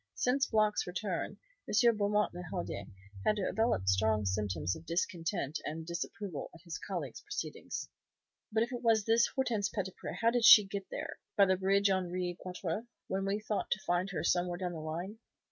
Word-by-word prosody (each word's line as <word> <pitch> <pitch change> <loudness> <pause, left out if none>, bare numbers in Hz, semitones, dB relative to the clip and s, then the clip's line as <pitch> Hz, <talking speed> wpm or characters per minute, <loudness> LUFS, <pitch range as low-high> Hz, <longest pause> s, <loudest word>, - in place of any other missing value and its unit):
Since 265 +2 +2
Block's 215 -3 +2
return, 180 0 -3 0.3
M. 235 +2 +5
Beaumont 210 0 +1
le 175 - -6
Hardi 100 - -4 0.4
had 215 - +3
developed 210 - 0
strong 105 +2 +3
symptoms 95 -4 -1
of 160 - -12
discontent 170 -2 -1
and 160 +2 -4
disapproval 170 -1 -4
at 165 - -14
his 170 -3 -6
colleague's 160 - -5
proceedings. - - -5 0.6
"But 220 +1 +3
if 240 - -4
it 245 - -4
was 225 -3 +3
this 230 +1 +4
Hortense 230 -6 +1
Petitpré 190 -3 -4
how 230 0 +4
did 240 -1 +1
she 215 - +11
get 195 0 -5
there, - - -5 0.2
by 200 - +8
the 190 0 +3
bridge 195 +1 +3
Henri 180 -1 -1
Quatre, 185 +4 -4 0.2
when 195 0 -1
we 200 +2 0
thought 210 -1 -2
to 195 - -1
find 175 +2 +1
her 195 - -3
somewhere 175 0 +1
down 180 -1 -3
the 165 - -5
line? 170 +7 -5
190 Hz, 180 wpm, -33 LUFS, 170-210 Hz, 0.6 s, she